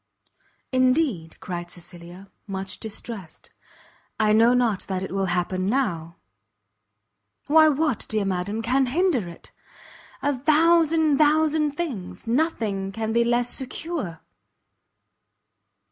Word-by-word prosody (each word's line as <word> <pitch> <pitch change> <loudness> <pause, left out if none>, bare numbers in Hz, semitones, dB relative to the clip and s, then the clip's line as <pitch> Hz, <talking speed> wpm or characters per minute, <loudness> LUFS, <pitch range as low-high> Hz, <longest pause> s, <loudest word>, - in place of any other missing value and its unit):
"Indeed," 255 - +1
cried 175 -1 -6
Cecilia, 175 +2 -12 0.2
much 195 0 -5
distressed, 210 -5 -8 0.7
"I 215 -1 +3
know 230 +3 +5
not 235 -6 +2
that 190 -1 -2
it - - -6
will 195 0 -1
happen 185 +1 -1
now." 180 -9 -1 1.3
"Why 315 +1 +6
what, 300 -4 0
dear 215 -2 0
madam, 195 +4 -2
can 260 +3 +2
hinder 290 - +1
it?" 170 - -14 0.7
"A 285 -1 +1
thousand, 315 +1 +3
thousand 305 0 +3
things! 280 - -5
nothing 225 -7 -1
can 220 +2 -3
be 235 0 +3
less 240 +1 +1
secure." 265 - -5
230 Hz, 110 wpm, -24 LUFS, 190-290 Hz, 1.3 s, Why